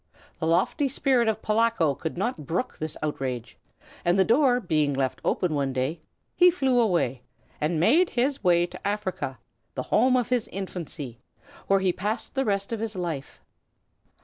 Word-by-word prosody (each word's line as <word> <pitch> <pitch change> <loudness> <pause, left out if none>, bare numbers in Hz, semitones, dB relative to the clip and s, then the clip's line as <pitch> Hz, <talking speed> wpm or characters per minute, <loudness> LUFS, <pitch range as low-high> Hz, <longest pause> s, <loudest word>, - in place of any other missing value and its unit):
The 160 - -1
lofty 185 - +2
spirit 260 -3 +2
of 220 0 -1
Polacko 215 -8 +2
could 160 +5 -5
not 190 - -2
brook 180 +10 -2
this 155 -1 -4
outrage, 130 -5 -3 0.5
and 175 +2 +2
the 190 - +4
door 250 +2 +4
being 155 - +1
left 135 -1 -1
open 175 -4 0
one 140 -2 0
day 135 +6 -2 0.3
he 360 0 +7
flew 270 -8 +2
away 170 - +1 0.4
and 155 +2 0
made 295 - +4
his 265 +2 0
way 175 -2 +4
to 175 - -7
Africa, 190 -10 -3 0.4
the 130 - -2
home 255 +3 +5
of 245 - -1
his 250 -3 +1
infancy, 165 -10 -6 0.5
where 195 0 +3
he 185 -2 +2
passed 210 +6 -3
the 270 0 0
rest 200 +1 -1
of 225 - -2
his 220 -1 -3
life. 165 -7 -5
185 Hz, 170 wpm, -26 LUFS, 155-235 Hz, 0.5 s, he